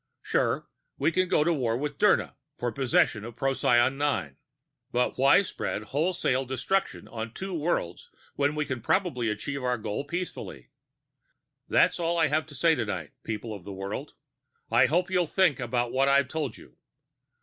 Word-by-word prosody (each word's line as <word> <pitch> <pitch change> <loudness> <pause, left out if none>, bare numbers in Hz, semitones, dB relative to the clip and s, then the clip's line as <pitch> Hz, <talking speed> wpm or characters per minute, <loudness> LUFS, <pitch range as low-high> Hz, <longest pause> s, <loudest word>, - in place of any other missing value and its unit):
Sure, - - 0 0.3
we 160 - +2
can 185 +2 +1
go 150 - +3
to 170 +2 +2
war 120 -6 0
with 145 +1 -4
Dirna 210 -2 +3 0.2
for 120 -1 -2
possession 120 -3 +2
of 120 0 -8
Procyon 130 0 +2
VIII. 110 - 0 0.6
But 125 +1 +1
why 140 +8 +6
spread 110 - -4
wholesale 140 - 0
destruction 130 +10 -1
on 115 0 -6
two 190 0 -5
worlds 150 - -2 0.3
when 145 +1 +1
we 150 0 0
can 130 -4 -4
probably 125 - +1
achieve 135 +6 -4
our 125 -1 +1
goal 105 +4 -3
peacefully? 170 +5 -6 1.0
"That's - - +3
all 170 0 0
I 160 -2 +3
have 155 +2 0
to 145 - -11
say 165 +4 +4
tonight, 100 - -3
people 110 0 -5
of 100 -4 -9
the 100 - -7
world. 95 +1 -5 0.6
I - - +5
hope 175 +4 +1
you'll 180 -2 +2
think 175 -6 +2
about 120 -1 -1
what 135 +1 +2
I've 140 -2 +4
told 150 -6 -3
you. - - -17
135 Hz, 170 wpm, -27 LUFS, 120-160 Hz, 1.0 s, why